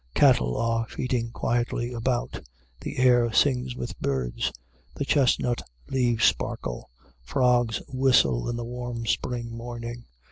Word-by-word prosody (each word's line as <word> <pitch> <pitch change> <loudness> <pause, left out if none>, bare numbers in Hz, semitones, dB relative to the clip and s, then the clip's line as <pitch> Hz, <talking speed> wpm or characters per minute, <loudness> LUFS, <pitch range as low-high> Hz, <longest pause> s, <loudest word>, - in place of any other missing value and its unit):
Cattle 60 0 +4
are 115 0 0
feeding 125 -2 -2
quietly 120 +1 -1
about. 120 +1 -2 0.4
The - - -6
air 120 -2 +4
sings 125 0 +2
with - - -6
birds. 65 -3 -1 0.4
The 140 - -2
chestnut 125 -4 +2 0.3
leaves 120 -4 +2
sparkle. - - -1 0.3
Frogs 120 - +1
whistle 125 - +3
in 120 - -2
the 120 0 -4
warm 120 -1 -5
spring 115 0 -2
morning. 120 0 -7
120 Hz, 120 wpm, -26 LUFS, 115-125 Hz, 0.4 s, Cattle